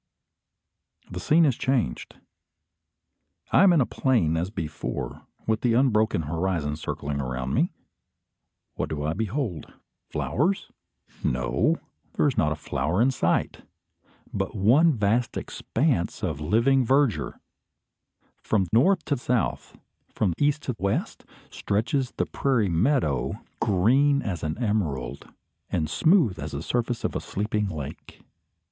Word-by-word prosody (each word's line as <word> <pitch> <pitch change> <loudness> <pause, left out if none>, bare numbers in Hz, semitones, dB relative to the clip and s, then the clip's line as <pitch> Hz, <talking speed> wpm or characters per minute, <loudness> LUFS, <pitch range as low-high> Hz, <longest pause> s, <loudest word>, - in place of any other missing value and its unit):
The 90 - -5
scene 160 - +4
is 135 -5 +2
changed. 125 - -1 1.4
I - - +6
am 195 -1 +7
in 165 -4 +4
a - - +3
plain 115 - +1
as 85 +3 -1
before, 80 -6 -5 0.2
with 110 0 0
the 120 -2 +2
unbroken 110 -8 +2
horizon 80 -1 -1
circling 70 -2 -4
around 65 0 -3
me. - - +2 1.0
What - - -3
do 75 -2 -3
I 80 - 0
behold? 110 - -3 0.4
Flowers? 180 +9 -1 0.5
No; 65 - +1 0.4
there - - +2
is 140 - 0
not 75 -2 +2
a - - 0
flower 75 +3 -2
in 125 +4 +4
sight, 85 -9 0 0.7
but - - -2
one 135 - +5
vast 115 -1 0
expanse 125 - -1
of 80 -5 -2
living 115 - +3
verdure. 135 -1 +1 1.0
From 100 -4 +1
north 170 - +4
to 145 - 0
south, 125 -1 -2 0.3
from 95 -5 0
east 145 +1 +1
to 130 - -2
west, 115 - -2 0.3
stretches 120 +5 -1
the - - +1
prairie 125 -8 +1
meadow, 85 - +1 0.2
green 135 +9 +3
as 90 -6 -3
an 80 0 -2
emerald, 100 - -2 0.4
and 80 -3 0
smooth 145 - +3
as 75 -1 -5
the 70 +3 -4
surface 120 +2 -1
of - - -2
a - - -1
sleeping 105 +1 -2
lake. 75 -5 -8
110 Hz, 130 wpm, -26 LUFS, 80-135 Hz, 1.4 s, am